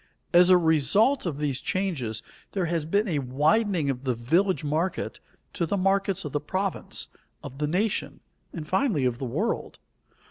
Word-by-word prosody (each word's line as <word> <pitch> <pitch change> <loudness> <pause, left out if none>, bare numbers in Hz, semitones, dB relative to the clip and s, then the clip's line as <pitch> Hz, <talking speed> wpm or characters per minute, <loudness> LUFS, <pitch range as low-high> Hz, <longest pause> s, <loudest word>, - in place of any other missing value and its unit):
As 175 +1 +7
a 185 - +8
result 175 - +3
of 150 -5 -3
these 145 -3 -1
changes, 140 - -2 0.3
there 190 -3 0
has 165 -2 -1
been 200 +7 +1
a 160 -6 0
widening 155 - +1
of 135 -1 -2
the 130 -3 0
village 170 - +1
market 155 +5 -2 0.3
to 170 -4 -1
the 200 - 0
markets 195 -1 +1
of 150 - -4
the 145 - -1
province, 190 +5 -2 0.4
of 135 - -9
the 150 - 0
nation, 195 +7 -1 0.3
and 155 -3 -7
finally 190 - +1
of 125 -1 0
the 135 - -3
world. 185 - -2
165 Hz, 170 wpm, -26 LUFS, 145-195 Hz, 0.4 s, a